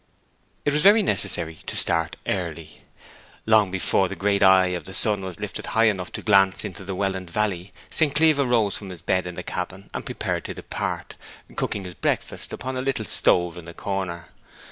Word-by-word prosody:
It 145 - +2
was 150 - +2
very 205 +4 +6
necessary 85 - +1
to - - -4
start 85 -1 +1
early. 85 -4 -4 0.6
Long 110 -3 +4
before 95 0 +1
the 100 - -6
great 100 +2 0
eye 95 -1 +6
of 90 -1 -4
the 95 - -5
sun 105 -3 +2
was 95 -3 -6
lifted - - -5
high 115 - +5
enough 95 -6 +1
to - - -6
glance 95 -2 +4
into 95 +1 -6
the 95 0 -5
Welland 95 -2 -2
valley, 100 -1 -2 0.2
St. 150 -3 +1
Cleeve 155 -1 +4
arose 120 -6 +2
from 100 - -7
his 90 -3 -10
bed 95 -1 0
in 90 - -7
the - - -6
cabin 95 +2 -6
and - - -4
prepared - - -3
to - - -6
depart, - - -4 0.4
cooking 100 - -2
his 90 -1 -8
breakfast 80 - -2
upon 130 +1 -4
a - - -1
little 130 -5 -1
stove 90 -2 +4
in 85 - -12
the 85 - -10
corner. 95 -4 -4
95 Hz, 195 wpm, -24 LUFS, 90-110 Hz, 0.6 s, very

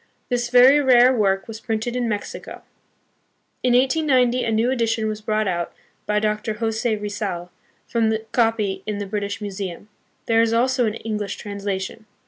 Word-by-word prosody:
This 240 -1 -1
very 255 +4 +7
rare 255 -2 +6
work 195 -3 +1
was 225 -1 -7
printed 225 +1 -2
hi 250 - -1
Mexico. 220 -4 -4 1.0
In 250 -1 +2
1890 255 -2 +3
a 225 - -1
new 225 +3 +2
edition 225 -3 0
was 215 0 -4
brought 215 0 0
out 175 -2 -2 0.3
by 210 - +1
Dr. 215 0 -1
Jose 225 +1 -1
Rizal, 205 -4 -4 0.4
from 230 -2 +1
the 220 0 -2
copy 220 -5 +1
hi 210 - -1
the 205 0 -4
British 205 +1 -4
Museum. 200 -1 -6 0.4
There 225 0 +3
is 230 0 +2
also 250 +1 +2
an 215 - -2
English 210 -3 -4
translation. 200 +1 -5
220 Hz, 160 wpm, -22 LUFS, 205-240 Hz, 1.0 s, very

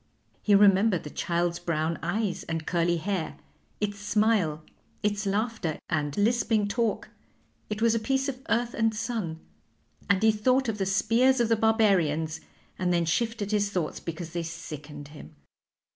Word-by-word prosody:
He 205 - +4
remembered 200 -1 +5
the 150 - -8
child's 170 0 -1
brown 165 -1 -1
eyes 195 +3 -1
and 160 -1 -3
curly 170 0 +1
hair, 180 -1 -3 0.4
its 205 -1 -2
smile, 205 -7 +1 0.4
its 205 0 0
laughter, 205 -5 -1
and 145 -3 -1
lisping 220 -1 +2
talk 225 +1 -1 0.6
it 215 +1 -2
was 230 -1 +4
a 230 - +1
piece 265 +5 0
of 260 -2 -4
earth 240 +1 +1
and 225 -1 +1
sun 210 -8 -3 0.7
and 200 +1 +3
he 220 - +6
thought 255 +5 +2
of 215 -2 -2
the 195 - 0
spears 230 +7 +3
of 235 -1 +2
the 230 - +4
Barbarians, 185 -9 +2 0.4
and 180 -1 +1
then 170 -1 +2
shifted 215 +4 -1
his 205 -1 +1
thoughts 180 -6 -2
because 165 0 -6
they 170 0 -2
sickened 150 -3 -8
him. 145 - -12
200 Hz, 160 wpm, -27 LUFS, 165-225 Hz, 0.7 s, he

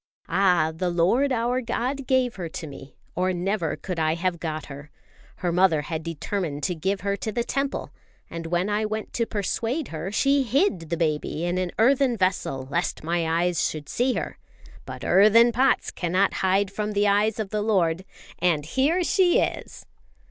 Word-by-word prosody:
"Ah, 180 -5 +3
the 180 +2 -1
Lord 190 +12 +2
our 245 +1 0
God 250 +3 -3
gave 255 -4 +1
her 175 -3 -4
to 160 - -6
me, 140 -2 -11 0.2
or 185 +1 0
never 180 -2 -1
could 180 -3 -5
I 160 0 +1
have 175 0 -1
got 155 -2 -4
her! 145 +1 -10 0.5
Her 175 -1 -2
mother 170 -4 +3
had 160 0 -4
determined 165 -1 -4
to 185 - 0
give 190 +4 -2
her 200 +1 0
to 220 - -4
the 235 +3 -1
Temple; 275 +2 -2 0.4
and 165 0 -6
when 175 +3 0
I 210 +1 0
went 215 0 -4
to 230 -1 0
persuade 230 - -2
her, 165 +4 -5
she 275 +6 +3
hid 240 - 0
the 170 - -1
baby 155 0 -1
in 175 +1 0
an 185 -1 -1
earthen 255 +1 +3
vessel 180 -8 -1
lest 170 0 -1
my 165 0 0
eyes 175 -2 +1
should 150 -2 -7
see 250 +1 +1
her. - - -4 0.5
But - - -7
earthen 220 +4 +6
pots 255 +3 +2
cannot 185 +3 +1
hide 190 +1 +2
from 210 +1 -3
the 205 0 +2
eyes 205 +3 +2
of 215 -3 -4
the 210 -1 -1
Lord. 185 -5 +1 0.4
And 165 -5 +1
here 285 - +1
she 355 0 +3
is!" - - -3
190 Hz, 185 wpm, -25 LUFS, 170-230 Hz, 0.5 s, earthen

